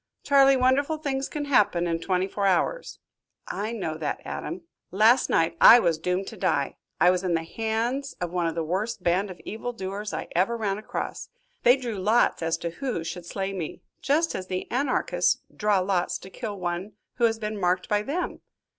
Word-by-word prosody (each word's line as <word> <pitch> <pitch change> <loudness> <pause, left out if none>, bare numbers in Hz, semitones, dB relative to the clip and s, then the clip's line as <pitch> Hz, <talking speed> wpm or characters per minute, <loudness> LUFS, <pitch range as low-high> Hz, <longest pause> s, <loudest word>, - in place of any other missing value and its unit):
"Charley, 275 -1 +5
wonderful 275 +5 +2
things 275 -3 -2
can 295 -1 -4
happen 205 -10 +3
in 165 -1 -1
twenty 185 +1 0
four 200 0 -1
hours." 195 - 0 0.5
"I 210 +3 -3
know 175 -9 -3
that, 150 -2 -2
Adam." 345 +1 -5 0.3
"Last 220 +6 +4
night 165 +1 +2
I 235 - +11
was 170 -9 +1
doomed 180 +3 -1
to - - -11
die. 160 -7 0 0.2
I 180 - +6
was 180 0 -1
in 180 -2 +1
the 165 - -1
hands 230 +8 -2
of 175 -1 -3
one 175 -2 0
of 165 - -3
the 165 - -1
worst 190 +5 -2
band 185 +4 +1
of 180 -2 -9
evil 245 +3 -5
doers 200 0 -5
I - - -4
ever 195 +7 +2
ran 205 -2 -1
across. 215 - -5 0.3
They 245 +3 +6
drew 235 -6 -4
lots 215 +2 +2
as 165 0 0
to 170 - -1
who 245 -3 -3
should 170 +1 -6
slay 195 +1 -3
me 170 -5 -6 0.2
just 315 +5 +1
as 185 -1 -5
the 185 0 -3
Anarchists 255 +1 +1 0.2
draw 210 -3 +2
lots 185 -1 0
to 190 - -13
kill 210 -3 -6
one 175 +3 -3 0.2
who 240 - +3
has 225 -1 +2
been 215 -1 -4
marked 180 0 +1
by 210 0 +1
them." 295 +11 -3
200 Hz, 200 wpm, -26 LUFS, 180-240 Hz, 0.5 s, I